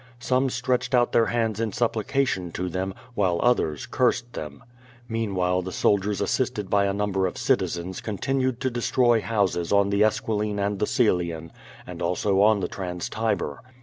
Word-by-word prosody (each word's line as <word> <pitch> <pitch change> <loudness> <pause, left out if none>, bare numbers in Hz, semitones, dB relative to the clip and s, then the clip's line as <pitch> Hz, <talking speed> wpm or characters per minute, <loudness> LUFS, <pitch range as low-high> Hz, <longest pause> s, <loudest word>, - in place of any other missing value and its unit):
Some 130 +2 +1
stretched 125 0 0
out 120 -1 +3
their 115 - +3
hands 115 -3 -1
in 115 -3 -1
supplication 115 -5 0
to 90 0 -3
them, 95 +2 -3 0.2
while 95 -6 +1
others 100 -12 +1
cursed 120 -1 0
them. 75 -2 -7 0.4
Meanwhile 95 -5 0
the 95 +1 -6
soldiers 100 +2 +1
assisted 105 -1 -1
by 100 -1 +3
a 100 - +1
number 100 -2 0
of 90 - -6
citizens 90 +2 -1
continued 130 +4 -1
to 130 -1 0
destroy 120 -1 +2
houses 100 -7 0
on 100 0 +3
the 100 +1 +3
Esquiline 105 -1 0
and 100 0 -1
the 105 - +1
Coelian, 85 -8 0 0.3
and 90 -1 -8
also 95 +3 +1
on 105 -1 +4
the 90 - -1
Trans 90 -3 -5
Tiber. 70 -1 -2
105 Hz, 165 wpm, -25 LUFS, 90-120 Hz, 0.4 s, on